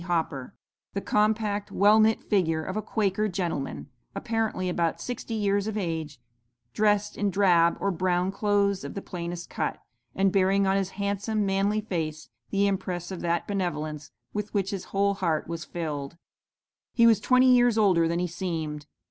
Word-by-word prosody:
Hopper, 160 -7 -2 0.4
the - - +1
compact, 210 0 0
well 210 +2 +5
knit 220 0 +3
figure 165 -6 +1
of 185 - -5
a 215 - -1
Quaker 215 -1 0
gentleman, 170 -10 -3 0.3
apparently 220 -3 -1
about 170 -2 0
sixty 240 -2 -5
years 200 -1 +1
of 215 -1 -3
age, 160 - -3 0.5
dressed 210 +1 +2
in 205 0 0
drab 175 -4 +4
or 200 - 0
brown 180 +1 0
clothes 200 -1 +1
of - - -7
the 200 - -4
plainest 175 -1 -6
cut, - - -2 0.4
and 195 0 +3
bearing 195 +1 +3
on 190 0 +2
his 195 -1 0
handsome, 205 +1 -1
manly 195 +2 +1
face 155 - -4 0.2
the 200 0 +2
impress 185 -2 -2
of 185 - -5
that 170 -1 -1
benevolence 155 -7 -3 0.2
with 210 0 -3
which 195 -1 0
his 195 -3 -4
whole 200 0 +1
heart 170 -6 -1
was 170 0 -5
filled. 155 -3 -5 0.8
"'He 235 - +5
was 225 -3 +6
twenty 255 +3 +5
years 245 -2 +4
older 185 -6 +4
than 170 +1 -1
he 180 - 0
seemed. 160 -4 -4
195 Hz, 165 wpm, -27 LUFS, 170-205 Hz, 0.8 s, was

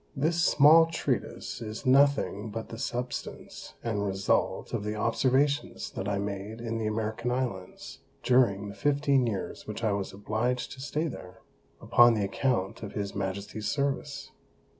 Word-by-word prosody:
This 165 +5 +1
small 160 +1 +7
Treatise 165 -6 -3
is 110 +4 -6
nothing 130 -5 +3
but 110 +2 -6
the 115 - -8
Substance 125 +1 -5
and 110 -3 -1
Result 95 -1 0
of - - -1
the 105 +1 -3
Observations 140 +6 +1
that 95 - -4
I 100 - 0
made 100 +2 -4
in 115 -1 -3
the 110 - -1
American 110 +2 -2
Islands, 120 -8 -4 0.2
during 115 -6 +3
the - - -7
fifteen 140 0 +2
Years 105 -4 -4
which 105 +2 -6
I 110 - +2
was 100 -1 -2
obliged 110 +5 -2
to 130 - -9
stay 150 +3 -2
there, 90 - -9 0.4
upon 120 -1 +5
the 105 -2 0
account 100 -2 -1
of 100 -2 -7
his 100 -1 -3
Majesty's 100 +2 -4
Service. 140 0 -2
115 Hz, 155 wpm, -28 LUFS, 100-135 Hz, 0.4 s, small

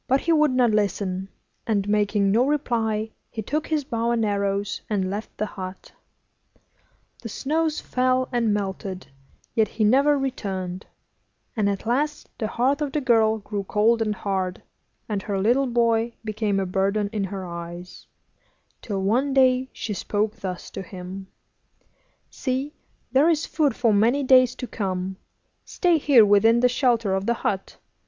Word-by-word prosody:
But 265 +1 +2
he 335 - +2
would 305 -1 +4
not 250 -3 +3
listen, 195 -2 -1 0.4
and, 205 -3 0
making 205 -1 +2
no 230 +4 +4
reply, 225 -7 0 0.2
he 220 - -5
took 300 +8 -2
his 310 -2 0
bow 230 -2 -2
and 235 -2 +1
arrows 200 0 -1
and 190 -3 0
left 210 +2 -6
the 215 - -1
hut. 185 -2 -8 1.3
The 230 - -6
snows 310 +6 -1
fell 255 0 +1
and 235 -3 +1
melted, 190 -2 -3 0.5
yet 220 -1 +3
he 220 - -2
never 275 +7 +4
returned; 190 -9 -4 0.7
and 210 -3 +1
at 200 +1 -3
last 290 +6 -1
the 220 - -1
heart 265 +7 0
of 290 -2 -2
the 300 - +1
girl 225 -4 +3
grew 205 -1 -5
cold 220 +4 +2
and 215 -1 0
hard, 190 -3 -3 0.4
and 205 -3 -2
her 195 0 -2
little 245 +7 +2
boy 235 -1 +1
became 215 -2 -1
a 195 - 0
burden 195 +3 0
in 205 -3 -1
her 190 0 -5
eyes, 175 +1 -8 0.7
till 195 -3 -3
one 260 +8 +1
day 260 -1 +4
she 215 - -5
spoke 210 +2 -1
thus 185 -2 -6
to - - -6
him: 190 +1 -8 1.0
'See, 265 +2 -3 0.4
there 275 +6 +4
is 325 -2 +1
food 295 -6 +1
for 230 -3 +2
many 235 +8 +3
days 255 -2 +5
to - - -5
come. 190 -4 -3 0.5
Stay 350 -3 +1
here 265 -7 +6
within 215 +3 +5
the 250 - +5
shelter 235 -5 +1
of 190 +1 -1
the 235 - +2
hut. 195 -1 -2
220 Hz, 160 wpm, -24 LUFS, 200-255 Hz, 1.3 s, here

